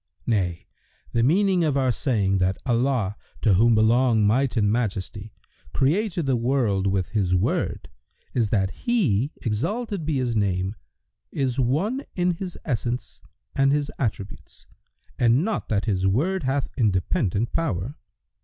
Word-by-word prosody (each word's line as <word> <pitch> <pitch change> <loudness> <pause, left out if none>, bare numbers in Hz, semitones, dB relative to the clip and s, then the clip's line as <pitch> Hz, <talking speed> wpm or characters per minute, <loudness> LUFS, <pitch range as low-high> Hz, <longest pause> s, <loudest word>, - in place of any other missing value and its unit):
Nay, 90 -7 -1 0.5
the 115 - +1
meaning 180 - +3
of 150 -3 +1
our 130 -2 +2
saying 100 -7 0
that 95 +1 +1
Allah 120 -5 +1 0.3
(to 110 - +4
whom 115 +5 +4
belong 110 0 +3
Might 125 +4 +2
and 105 -2 +3
Majesty!) 105 -1 -3 0.4
created 170 +4 +1
the 135 -2 +2
world 115 -6 +1
with 95 -2 0
His 95 -4 +1
Word 90 - -1 0.5
is 115 -4 +1
that 95 -3 +1 0.2
He 150 - +2
(exalted 190 - -2
be 150 -2 -1
His 125 -3 -1
name!) 95 -2 0 0.6
is 130 -2 -1
One 175 - 0
in 180 0 +2
His 180 +1 -6
essence 120 -2 -3 0.3
and 135 0 +3
His 145 0 0
attributes 105 -5 -5 0.5
and 120 +7 +3
not 220 -1 -3
that 105 -2 0
His 95 -4 +1
Word 165 - +1
hath 135 0 0
independent 105 -1 0
power. 125 - -1
120 Hz, 140 wpm, -24 LUFS, 100-145 Hz, 0.6 s, to